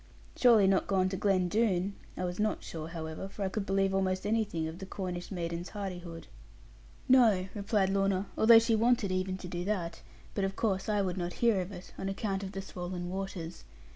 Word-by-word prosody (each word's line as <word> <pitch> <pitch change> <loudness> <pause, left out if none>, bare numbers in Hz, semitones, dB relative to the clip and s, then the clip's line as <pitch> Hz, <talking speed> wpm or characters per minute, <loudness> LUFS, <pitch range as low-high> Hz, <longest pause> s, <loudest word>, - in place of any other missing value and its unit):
'Surely 230 -5 +6
not 190 0 +3
gone 190 -2 +2
to 190 - -3
Glen 190 -2 +2
Doone?' 200 -2 +1 0.2
I 180 - -1
was 175 +1 -4
not 215 0 0
sure, 160 -1 -6
however: 165 +2 -6
for 200 - -5
I - - 0
could 195 +1 -3
believe 195 0 +2
almost 190 0 0
anything 210 -7 0
of 160 +2 -7
the 190 - -7
Cornish 180 -2 -5
maiden's 170 -1 -3
hardihood. 180 -5 -6 0.8
'No,' 220 -8 +5
replied 200 -2 +1
Lorna, 195 0 +1
'although 230 +1 +8
she 225 0 +4
wanted 230 -2 +2
even 185 0 -1
to 185 - -8
do 175 0 -4
that. 185 -5 -2 0.3
But 200 - -1
of 195 0 -1
course 195 -1 0
I 205 -1 +2
would 185 -1 -2
not 175 -1 -2
hear 230 -5 +2
of 180 +2 -6
it, 180 -1 -10
on 195 - -2
account 195 0 -2
of 195 0 -6
the 195 0 -4
swollen 180 -1 -5
waters. 185 -3 -5
190 Hz, 200 wpm, -31 LUFS, 180-205 Hz, 0.8 s, although